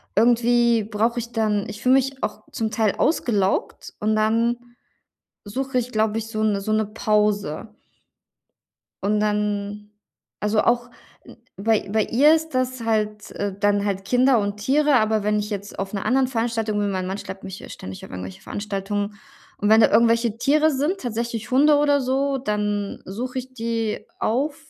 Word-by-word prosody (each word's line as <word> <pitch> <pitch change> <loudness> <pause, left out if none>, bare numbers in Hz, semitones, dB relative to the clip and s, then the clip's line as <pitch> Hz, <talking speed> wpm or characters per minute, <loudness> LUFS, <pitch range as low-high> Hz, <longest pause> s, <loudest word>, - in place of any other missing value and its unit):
irgendwie 235 0 +4
brauche 225 +3 0
ich 235 0 -6
dann 210 -3 0
ich 210 - -8
fühle 255 +1 +5
mich 270 0 0
auch - - -3
zum 220 -4 -2
Teil 215 -2 +1
ausgelaugt, 210 - 0
und 215 +1 +1
dann 230 +2 +2 0.9
suche 255 +5 -2
ich, 245 +1 -3
glaube 220 0 +1
ich, 225 0 -5
so 215 -1 -3
'ne 210 -2 +1
so 215 +2 -2
'ne 215 0 +2
Pause. 210 -2 0 1.3
Und 210 +1 +2
dann 210 0 -1 0.5
also, 210 +1 +2
auch 240 0 +1 0.7
bei 215 0 +1
bei 215 +1 +2
ihr 290 +7 +5
ist 320 0 0
das 255 -1 -1
halt, 215 -2 -1
äh, 205 -1 -3
dann 205 0 +2
halt 195 -1 -2
Kinder 250 +1 +4
und 205 0 -2
Tiere. 280 +6 +2
Aber 215 -2 +2
wenn 210 0 +1
ich 210 +1 -3
jetzt 205 0 -5
auf 195 +1 -4
'ner 195 - -2
anderen 260 0 +3
Veranstaltung 225 -3 -1
bin 205 -1 0
mein 185 -1 -2
Mann 190 +2 -3
schleppt 190 0 -8
mich 190 -1 -7
ja - - -11
ständig 95 0 -9
auf - - -10
irgendwelche 95 0 -7
Veranstaltungen, 205 0 -3 0.5
und 205 - +1
wenn 220 +1 +7
da - - +5
irgendwelche 230 0 +3
Tiere 305 +3 +3
sind, 295 +8 0
tatsächlich 235 -1 -4
Hunde 290 +3 +5
oder 290 -1 +3
so, 270 +2 0
dann 210 -3 -2
suche 245 +7 -5
ich 255 +1 -10
die 230 -2 -2 0.2
auf, 285 +6 0
220 Hz, 170 wpm, -23 LUFS, 205-245 Hz, 1.3 s, wenn